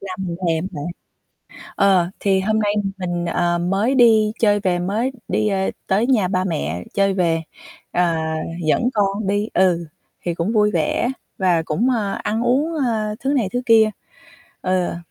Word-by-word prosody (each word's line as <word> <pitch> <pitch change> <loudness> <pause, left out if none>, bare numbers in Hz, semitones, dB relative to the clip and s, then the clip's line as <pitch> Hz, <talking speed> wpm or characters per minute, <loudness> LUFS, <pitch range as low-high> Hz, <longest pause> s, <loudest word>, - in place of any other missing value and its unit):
làm 185 -2 -6
mình 170 - -4
thèm 165 +2 0
bạn. 145 -3 -5 0.9
Ờ, 190 -3 +3
thì 195 -1 +2
hôm 215 +3 +1
nay 205 -1 +1 0.2
mình, 175 -2 -3
ờ, 175 0 0
mới 195 +9 0
đi 220 -4 +5
chơi 205 -2 +3
về, 185 -3 0
mới 210 +8 -1 0.2
đi, 215 0 0
ơ, 190 -1 0 0.2
tới 205 +5 +2
nhà 225 -8 +3
ba 185 0 0
mẹ 85 - -3
chơi 195 -1 +2
về, 170 -3 +1 0.5
ờ, 170 -2 +1 0.5
dẫn 235 +10 +2
con 200 0 0
đi, 205 +1 0
ừ, 175 -2 +2 0.4
thì 175 - 0
cũng 175 +7 -2
vui 210 -1 +3
vẻ 305 +2 0 0.3
và 180 -3 +2
cũng, 200 +13 0
ơ, 215 -6 0
ăn 220 +2 -1
uống, 275 +7 +1
ơ, 215 -2 -1
thứ 270 +2 -1
này 245 -8 +1
thứ 245 - 0
kia. 225 -2 +5 0.7
Ờ. 185 -2 0
195 Hz, 170 wpm, -20 LUFS, 175-220 Hz, 0.9 s, đi